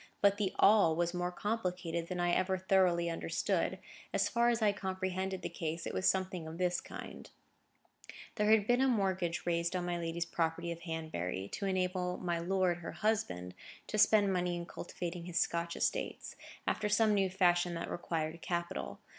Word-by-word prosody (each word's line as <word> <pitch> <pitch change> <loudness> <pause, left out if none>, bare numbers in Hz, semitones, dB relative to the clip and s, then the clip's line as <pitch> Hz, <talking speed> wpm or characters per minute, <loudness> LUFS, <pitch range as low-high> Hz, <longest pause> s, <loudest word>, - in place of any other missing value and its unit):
But 200 0 +4
the 205 -3 0
"all" 200 -6 +6
was 170 +1 0
more 180 0 -1
complicated 180 -5 -2
than 180 0 -4
I 175 0 +2
ever 185 +2 +1
thoroughly 185 -2 +3
understood. 165 -1 -1 0.3
As - - +1
far 235 0 +3
as 235 -1 +2
I 215 -2 +4
comprehended 190 -1 -3
the - - -1
case, 165 0 -4
it - - -4
was 185 - +3
something 185 -3 -1
of 160 +1 -7
this 180 -1 +1
kind:—There 210 -1 -8
had 215 -2 +5
been 245 +3 +3
a 270 - +4
mortgage 190 -7 0
raised 170 +1 0
on 180 -1 -1
my 175 -1 -1
lady's 170 0 -2
property 170 0 -1
of 170 - -5
Hanbury, 155 - -4
to 200 - -3
enable 180 -1 0
my 175 -2 -1
lord, 180 0 +1
her 170 -1 -7
husband, 90 - -1 0.3
to 215 - -2
spend 205 -2 +5
money 180 -1 0
in 170 0 -4
cultivating 175 0 -6
his 175 -1 -1
Scotch 170 0 0
estates, - - -2 0.3
after 210 - 0
some 215 +1 +4
new 195 -2 +2
fashion 175 -2 +2
that 165 - -3
required 165 -1 -3
capital. 170 - -3
180 Hz, 175 wpm, -33 LUFS, 170-190 Hz, 0.3 s, all